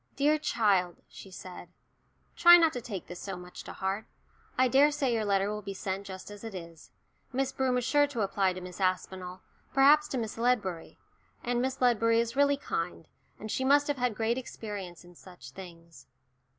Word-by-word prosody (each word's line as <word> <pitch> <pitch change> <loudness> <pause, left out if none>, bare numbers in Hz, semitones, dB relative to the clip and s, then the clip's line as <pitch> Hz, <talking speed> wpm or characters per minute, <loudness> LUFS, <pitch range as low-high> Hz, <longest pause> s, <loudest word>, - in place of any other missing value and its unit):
"Dear 300 +2 +2
child," 195 - +1
she 195 - -12
said, 180 -1 -10 0.7
"try 345 0 +9
not 330 -2 +3
to 245 - -4
take 205 -6 -6
this 175 - -9
so 195 -2 -6
much 180 0 -10
to - - -8
heart. 195 +3 -3 0.5
I 255 0 +4
daresay 275 0 +3
your 220 -2 0
letter 200 0 +1
will 210 0 -4
be 200 -1 -6
sent 195 0 -4
just 190 +1 -8
as 205 +1 -11
it 225 -3 -7
is. 170 -2 -10 0.4
Miss 265 +1 -1
Broom 260 -1 0
is 250 - -1
sure 290 +2 +3
to 245 -6 -4
apply 195 -1 +1
to 185 - -8
Miss 180 +1 -9
Aspinall, 185 0 -2 0.3
perhaps 295 +2 +6
to 270 - -3
Miss 225 -2 -4
Ledbury. 210 -9 -1 0.5
And 240 0 0
Miss 265 +1 -2
Ledbury 230 -2 +3
is 235 +1 -1
really 285 0 +3
kind, 165 - -4 0.3
and 215 0 -6
she 260 - -1
must 285 +2 +4
have 290 -1 -1
had 250 -3 0
great 230 +3 0
experience 200 -8 -8
in 175 - -15
such 175 -6 -13
things." 170 -5 -13
215 Hz, 190 wpm, -29 LUFS, 185-260 Hz, 0.7 s, try